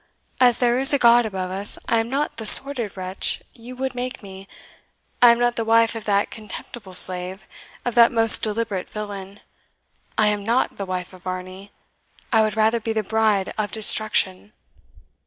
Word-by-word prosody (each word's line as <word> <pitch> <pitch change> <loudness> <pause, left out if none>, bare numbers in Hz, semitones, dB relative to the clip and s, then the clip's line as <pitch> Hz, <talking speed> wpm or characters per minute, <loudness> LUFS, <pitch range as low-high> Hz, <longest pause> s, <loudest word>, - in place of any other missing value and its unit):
as 245 -2 +4
there 245 0 +1
is 270 - +3
a - - +4
God 235 -2 +4
above 185 -3 -5
us, 195 +2 -2
I 230 - +1
am 225 +1 -3
not 280 +1 -3
the 225 - -6
sordid 240 -6 +4
wretch 185 +1 -2
you 240 +2 -12
would 265 +1 -4
make 250 -2 -6
me! 195 0 -12 0.7
I 245 - +8
am 235 - +4
not 240 0 0
the 230 - -1
wife 225 0 +2
of 225 -2 -8
that 200 -1 0
contemptible 210 -2 -10
slave 185 +1 -2 0.4
of 245 - -2
that 235 0 +5
most 225 -1 +6
deliberate 215 -3 -3
villain! 200 -1 -8 0.8
I 215 - +3
am 205 -1 -3
not 235 +5 -1
the 195 - -6
wife 185 0 -5
of 185 - -15
Varney! 185 +2 -8 0.6
I 220 - +4
would 215 -1 -1
rather 220 +2 +2
be 225 0 -4
the 220 -1 -2
bride 215 -2 0
of 210 -1 -2
Destruction!" 210 -2 +1
220 Hz, 180 wpm, -21 LUFS, 195-235 Hz, 0.8 s, I